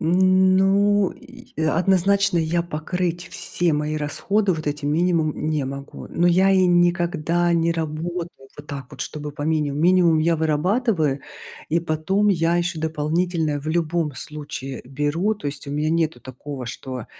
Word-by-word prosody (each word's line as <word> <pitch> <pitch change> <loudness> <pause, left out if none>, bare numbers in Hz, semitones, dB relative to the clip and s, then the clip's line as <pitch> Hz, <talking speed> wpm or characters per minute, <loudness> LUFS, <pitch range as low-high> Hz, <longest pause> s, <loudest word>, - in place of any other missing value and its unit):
Ну 190 +3 +3
и 250 -1 -15
однозначно 190 +4 +2
я 170 +1 +1
покрыть 175 +2 -3
все 175 -2 -1
мои 150 +1 -1
расходы 190 +7 0
вот 155 -2 -5
этим 145 0 -1
минимумом 160 -2 +1
не 150 -3 0
могу. 140 +1 -7
Но 175 - +1
я 185 +3 +4
и 190 -1 +4
никогда 175 -1 +2
не 170 0 +2
работаю 165 +2 -3 0.3
вот 145 - -11
так 140 -3 -6
вот, - - -11
чтобы 150 -1 -5
по 145 - -6
минимуму. 150 -2 0
Минимум 175 -2 +4
я 165 +1 +2
вырабатываю 160 - +1 0.5
и 165 +2 +1
потом 170 +6 0
я 170 -3 +2
ещё 175 -2 -1
дополнительно 160 0 -1
в 155 - -6
любом 165 -2 0
случае 135 -2 -7
беру, 145 - -1
то 195 - -8
есть 140 0 -5
у 140 - -5
меня 150 +2 0
нету 160 -6 0
такого, 130 0 -8
что 125 0 -6
165 Hz, 155 wpm, -22 LUFS, 150-180 Hz, 0.5 s, я